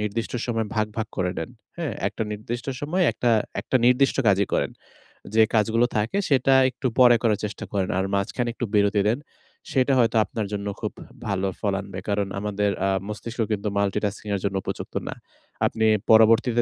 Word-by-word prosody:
নির্দিষ্ট 105 +2 -3
সময়ে 115 -2 -1
ভাগ, 110 -1 +1
ভাগ 110 -1 -1
করে 90 -2 0
নেন। 80 - -4 0.3
হ্যাঁ? 165 -3 -2 0.2
একটা 100 +3 -4
নির্দিষ্ট 115 +3 -5
সময় 170 +6 0
একটা 120 - 0 0.3
একটা - - 0
নির্দিষ্ট 125 +2 +4
কাজই 100 0 +3
করেন। - - +1 0.6
যে 110 - +5
কাজগুলো 115 +2 +3
থাকে 105 - 0
সেটা 135 -1 +4 0.2
একটু 130 +1 -3
পরে 120 -1 +8
করার 110 -3 +2
চেষ্টা 105 - -6
করেন। 95 -2 0
আর 95 - +1
মাঝখানে 120 +5 -1
একটু 120 - -3
বিরতি 100 0 +3
দেন। 120 - 0 0.5
সেটা 135 0 +2
হয়তো 115 -1 +3
আপনার 110 - -4
জন্য 100 0 -3
খুব - - -2 0.4
ভালো 100 -1 0
ফল 100 -2 0
আনবে। 95 -1 -7
কারণ 100 -1 0
আমাদের 105 0 0 0.2
আ - - +2 0.2
মস্তিষ্ক 115 +3 -7
কিন্তু 105 0 -1
মাল্টিটাস্কিং 100 +1 -1
এর - - -2
জন্য 100 -1 -1
উপযুক্ত - - -6
না। - - -3 0.5
আপনি 110 0 +1 0.3
পরবর্তীতে 115 +2 +5
110 Hz, 175 wpm, -24 LUFS, 100-120 Hz, 0.6 s, পরে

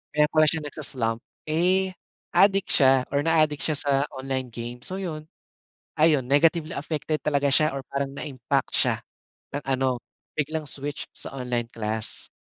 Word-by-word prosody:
kaya 150 0 +5
pala 155 0 +5
siya 160 +1 +1
nagsa-slump 130 -6 -2 0.3
eh 185 +3 +2 0.4
adik 195 -1 +5
siya 135 -2 +5
or 145 - +2
na-aadik 155 -3 +3
siya 155 - +1
sa 145 -2 0 0.2
online 130 -2 -3
game 120 +1 -6
so 185 - -3
yun. 155 -4 -4 0.8
Ayun 155 -3 +5
negatively 155 +4 +3
affected 155 +1 -2
talaga 140 -1 +2
siya 155 0 +3
or 135 - -3
parang 140 0 -2
na-impact 135 -5 -2
siya - - +3 0.6
ng 145 - -3
ano, 130 -2 +1 0.4
biglang 155 +1 -1
switch 145 +1 -4
sa - - -5
online 125 -2 -1
class. 110 0 -3
145 Hz, 150 wpm, -26 LUFS, 130-155 Hz, 0.8 s, kaya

